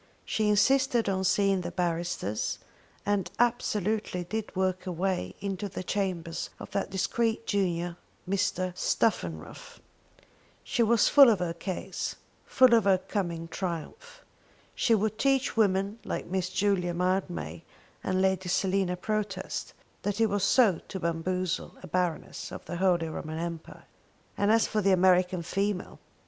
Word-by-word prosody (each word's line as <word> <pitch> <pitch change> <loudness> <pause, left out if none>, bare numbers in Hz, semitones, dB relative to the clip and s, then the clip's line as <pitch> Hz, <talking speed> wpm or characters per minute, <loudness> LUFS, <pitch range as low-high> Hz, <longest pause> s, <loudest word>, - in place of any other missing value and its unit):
She 215 -1 0
insisted 245 +2 +3
on 190 -1 0
seeing 195 0 +3
the 175 - -4
barristers, 170 - -2 0.5
and 205 -3 0
absolutely 215 -5 0
did 215 +4 -5
work 185 0 0
her 185 - -3
way 180 - -2
into 200 0 -3
the 185 - -6
chambers 180 -4 -2
of - - -9
that 200 - -1
discreet 225 +4 0
junior 175 -3 -1 0.3
Mr. 185 -2 0
Stuffenruff. 85 - -1 0.8
She - - -1
was 230 -1 +4
full 280 -3 +8
of 220 - +4
her 175 -2 -2
case, 185 +1 -4 0.3
full 255 -2 +5
of 225 -3 +5
her 195 -2 +5
coming 175 -3 -3
triumph. 185 - -6 0.5
She 230 - +3
would 215 +1 -1
teach 270 -1 +2
women 200 0 +1
like - - -3
Miss 185 0 -2
Julia 185 -3 +1
Mildmay 85 - -1 0.4
and 185 0 +1
Lady 190 -1 +1
Selina 185 0 +1
Protest 200 -1 -3 0.3
what 205 0 -2
it 225 - +5
was 205 +1 +1 0.3
to 190 - -5
bamboozle 180 +2 -2
a - - -7
Baroness 175 0 -2
of - - -8
the 175 - -5
Holy 175 -3 +2
Roman 155 0 -5
Empire! 170 -1 -6 0.5
And 205 +1 +2
as 225 0 +4
for 215 - 0
the 195 -1 +4
American 180 -1 +3
female 195 +2 -2
190 Hz, 140 wpm, -28 LUFS, 175-205 Hz, 0.8 s, full